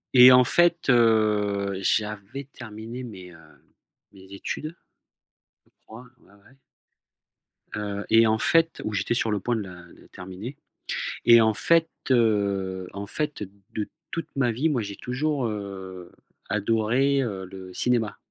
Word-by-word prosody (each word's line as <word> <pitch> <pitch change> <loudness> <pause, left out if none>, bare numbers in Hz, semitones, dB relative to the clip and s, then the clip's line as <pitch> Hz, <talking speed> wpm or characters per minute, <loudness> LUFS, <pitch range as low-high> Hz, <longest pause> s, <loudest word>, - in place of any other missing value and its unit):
Et 125 0 +10
en 125 0 +7
fait, 175 +4 +3
heu 105 -4 +2
j'avais 105 +5 -2
terminé 120 -1 -9
mes, 95 -7 -10
heu 85 - -15 0.7
mes 95 -1 -17
études, 155 +10 -5 0.9
je - - -31 0.2
crois, 115 +3 -12
ouais - - -24
ouais 100 +6 -22 1.2
heu 100 -1 -4
et 115 0 +5
en 110 - +2
fait 165 +5 +3
où 105 - -3
j'étais 100 +3 -1
sur 115 -1 0
le 105 - 0
point 120 +5 -1
de 110 - -2
la 95 -2 -10 0.2
de - - -19
terminer, 95 +8 -8 0.7
et 115 -1 +8
en 110 -1 +3
fait, 165 +8 +4 0.2
heu, 100 -5 +1
en 100 +1 -6
fait, 150 -2 -3 0.3
de 105 -1 -3 0.2
toute 165 - -4
ma 125 -3 +1
vie 140 +8 0
moi 130 -6 0
j'ai 100 -1 -6
toujours, 135 +3 -2
heu, 95 -4 -7 0.4
adoré, 115 +6 +1
heu, 100 -7 -4
le 95 0 -11
cinéma. 120 -1 0
110 Hz, 145 wpm, -25 LUFS, 100-125 Hz, 1.2 s, Et